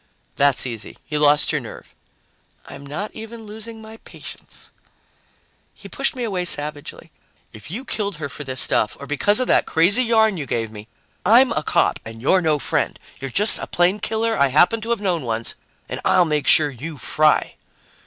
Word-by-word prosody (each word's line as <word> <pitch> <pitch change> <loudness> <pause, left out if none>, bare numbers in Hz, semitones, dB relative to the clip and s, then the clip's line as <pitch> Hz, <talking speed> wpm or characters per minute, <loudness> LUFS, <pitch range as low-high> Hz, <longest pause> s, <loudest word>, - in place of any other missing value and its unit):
"That's 140 -2 +2
easy. 115 -3 -7
You 150 -1 -1
lost 145 0 +4
your - - -1
nerve." - - -12 0.7
"I'm 140 - -10
not 150 +10 -6
even 225 0 -10
losing 220 +1 -9
my 220 +1 -12
patience." - - -13 1.0
He - - -12
pushed - - -2
me 250 - -4
away 195 -6 -2
savagely. 150 -3 -4 0.4
"If 110 +5 -12
you 235 - -6
killed 205 -6 -3
her 150 -2 -5
for 145 +2 -8
this 130 -1 -3
stuff 110 - +1
or 140 - -8
because 205 - +2
of 255 - +1
that - - +3
crazy 185 +9 +4
yarn 220 -4 +2
you 145 -4 -5
gave 115 -3 -3
me, 105 0 -11 0.4
I'm 240 +7 +5
a - - -1
cop - - +1
and 115 0 -10
you're 180 +10 +2
no 155 -3 +1
friend. 140 - -1 0.2
You're 135 - -6
just 210 - +5
a - - -6
plain 180 +4 +1
killer 225 +2 -1
I 140 - +3
happened 175 - +3
to 225 - -7
have 235 -3 -1
known 180 -5 -1
once, 115 -1 -2 0.3
and - - -6
I'll 180 - +3
make 150 -3 -2
sure 150 -2 +4
you 145 +5 -8
fry." 150 +4 +2
160 Hz, 190 wpm, -21 LUFS, 140-220 Hz, 1.0 s, I'm